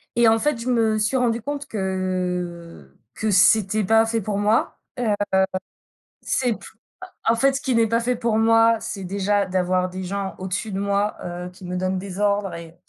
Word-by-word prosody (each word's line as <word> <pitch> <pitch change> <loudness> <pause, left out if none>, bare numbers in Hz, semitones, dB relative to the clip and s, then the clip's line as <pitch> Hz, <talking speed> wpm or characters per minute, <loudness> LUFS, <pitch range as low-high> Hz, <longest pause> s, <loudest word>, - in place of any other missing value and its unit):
et 235 -1 +5
en 225 0 +4
fait, 295 -2 0
je 245 - -6
me 225 -3 +2
suis 215 +5 0
rendu 235 -2 +1
compte 285 +3 -5
que 180 - -3 0.2
que 220 -1 -1
c'était 210 +2 +4
pas 225 +3 +4
fait 225 0 -1
pour 200 +1 -2
moi. 210 +2 +1 0.2
Heu, 225 -4 +1 1.1
c'est 250 -2 0
p - - -10 0.7
en 225 - +5
en - - 0
fait, 270 +3 +3
ce 275 - -3
qui 265 -5 0
n'est 230 -1 +4
pas 230 +1 +1
fait 245 +1 0
pour 230 -2 0
moi, 225 0 +5
c'est 195 -3 -6
déjà 200 +2 0
d'avoir 185 0 0
des 185 +1 -6
gens 195 +1 -4
au-dessus 190 +3 -3
de 190 - -3
moi, 200 +1 0
heu, 175 0 -5
qui 180 0 -13
me 180 - -4
donnent 185 0 -1
des 195 0 -7
ordres 200 -1 +1
et 170 0 -10
205 Hz, 200 wpm, -23 LUFS, 185-225 Hz, 1.1 s, et